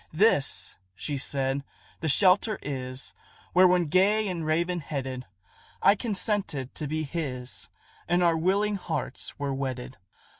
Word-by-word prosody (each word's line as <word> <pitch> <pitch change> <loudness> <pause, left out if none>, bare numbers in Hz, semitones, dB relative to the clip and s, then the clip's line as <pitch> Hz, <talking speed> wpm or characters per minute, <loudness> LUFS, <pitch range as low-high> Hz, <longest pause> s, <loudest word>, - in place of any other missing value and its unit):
"This," 160 -4 +2 0.2
she 145 +8 -3
said, 135 0 0 0.4
"the 160 - -2
shelter 195 +6 +4
is, 130 -1 -3 0.4
Where, 185 +1 +7
when 180 -1 +3
gay 200 +7 +3
and 175 -4 -3
raven 170 +3 +1
headed, 130 -4 -5 0.5
I - - +6
consented 200 - -1
to 150 - -3
be 155 +2 -1
his, 140 -5 -4 0.4
And 175 +1 +3
our 170 -1 +4
willing 200 +5 +1
hearts 185 - -4
were 140 -1 -2
wedded. 130 -1 -4
160 Hz, 135 wpm, -27 LUFS, 135-185 Hz, 0.5 s, Where